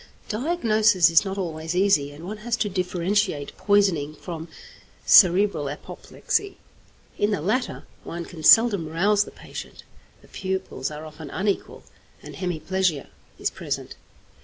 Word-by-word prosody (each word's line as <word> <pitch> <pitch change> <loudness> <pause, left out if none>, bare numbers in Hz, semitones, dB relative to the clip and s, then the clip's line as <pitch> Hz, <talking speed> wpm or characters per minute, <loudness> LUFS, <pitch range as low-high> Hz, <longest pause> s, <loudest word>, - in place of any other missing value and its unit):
Diagnosis 215 - +3
is 165 - +5
not 195 -1 -5
always 165 -2 -4
easy, 180 -7 +3
and 150 +4 -11
one 210 +4 -6
has 235 +2 -2
to 215 - 0
differentiate 185 -3 -1
poisoning 185 -8 +1
from 165 0 -7 0.6
cerebral 180 -5 +5
apoplexy. 390 - -4 0.6
In 205 - +2
the 205 - 0
latter 215 - -2 0.2
one 170 0 -6
can 165 -3 -10
seldom 200 0 +6
rouse 200 +6 +2
the - - -10
patient, - - -10 0.4
the - - -18
pupils 190 0 -4
are 150 +1 -8
often 155 -1 -10
unequal, 200 +5 -3 0.4
and - - -10
hemiplegia 180 -3 -1 0.3
is - - -1
present. - - -5
185 Hz, 135 wpm, -24 LUFS, 160-205 Hz, 0.6 s, seldom